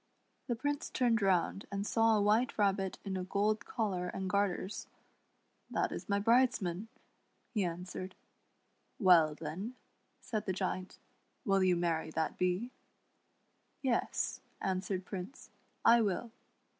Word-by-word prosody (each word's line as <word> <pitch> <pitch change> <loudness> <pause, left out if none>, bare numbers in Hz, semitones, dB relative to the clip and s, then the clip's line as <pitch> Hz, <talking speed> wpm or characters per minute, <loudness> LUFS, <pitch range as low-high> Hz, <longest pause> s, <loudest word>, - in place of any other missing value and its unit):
The 240 - 0
Prince 290 +4 -2
turned 235 -3 +2
round 195 0 +1
and 200 0 -2
saw 225 0 +4
a - - +2
White 220 +4 +2
Rabbit 195 -2 +1
in 195 -1 -2
a 185 - -2
gold 205 +3 0
collar 190 -6 -1
and 190 +1 -3
garters. 200 0 -1 0.4
" - - -43
That - - 0
is - - -6
my 200 - +3
bridesman," 215 -4 +2 0.7
he 210 -4 +1
answered. 180 +2 -5 0.8
"Well, 170 - +6
then," 175 +11 -5 0.4
said 215 -3 -4
the 190 - +1
Giant, 185 0 -3 0.5
"will 195 -2 +3
you 185 -1 +4
marry 165 -2 0
that 160 -1 -1
Bee 180 +7 0 0.3
} - - -43 0.2
" - - -43
" - - -43
Yes," 255 -3 0 0.2
answered 185 0 -2
Prince, 190 +7 -7 0.2
" - - -35
I 235 - +4
will." 220 +2 -1
195 Hz, 145 wpm, -33 LUFS, 180-220 Hz, 0.8 s, Well